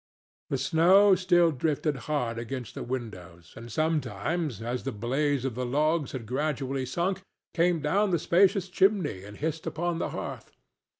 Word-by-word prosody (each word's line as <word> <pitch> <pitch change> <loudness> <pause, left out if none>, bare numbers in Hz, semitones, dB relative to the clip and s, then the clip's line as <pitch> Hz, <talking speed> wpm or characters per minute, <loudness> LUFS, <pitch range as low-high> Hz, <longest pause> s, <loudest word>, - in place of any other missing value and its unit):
The 135 - 0
snow 180 +9 +5
still 175 -2 +4
drifted 150 +1 -1
hard 120 -6 -1
against 125 +1 -6
the - - -6
windows, 90 -9 -7
and 115 +1 -10
sometimes, 155 - -1
as 120 +2 -3
the 135 - -3
blaze 135 +5 -1
of 135 - -1
the 125 +2 -3
logs 150 +3 +1
had 125 -4 -5
gradually 135 0 -2
sunk, 180 +7 -1 0.3
came 170 -2 +2
down 195 +8 +2
the 175 - +2
spacious 190 +4 +3
chimney 180 - +1
and 105 +1 -11
hissed 160 +1 -3
upon 170 +1 -2
the - - -2
hearth. - - -7
145 Hz, 160 wpm, -28 LUFS, 125-170 Hz, 0.3 s, snow